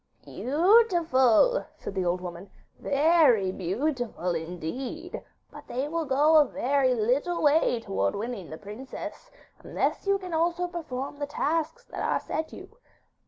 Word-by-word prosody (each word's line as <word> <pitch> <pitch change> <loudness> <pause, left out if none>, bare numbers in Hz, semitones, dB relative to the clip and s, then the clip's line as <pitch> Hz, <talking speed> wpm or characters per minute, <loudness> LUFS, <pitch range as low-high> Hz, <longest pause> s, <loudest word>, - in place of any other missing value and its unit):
'Beautiful,' 345 - +3
said - - -7
the 190 -2 -1
old 175 +1 0
woman; 180 +2 -8 0.3
'very 280 - +3
beautiful 215 - -2
indeed; 180 - -5 0.3
but - - -12
they 260 +4 -2
will 330 +1 -2
go 295 +3 +4
a 300 - +7
very 275 -2 +1
little 260 +10 0
way 290 -5 +3
towards 95 - -1
winning 215 -4 -5
the 155 - -7
princess, 230 - -8 0.3
unless - - -2
you 395 0 +3
can 365 -3 -8
also 340 +2 +1
perform 290 -5 -6
the 290 - -2
tasks 325 +10 -1
that - - -7
are - - +1
set 315 0 -4
you. 450 - -12
275 Hz, 140 wpm, -27 LUFS, 210-330 Hz, 0.3 s, a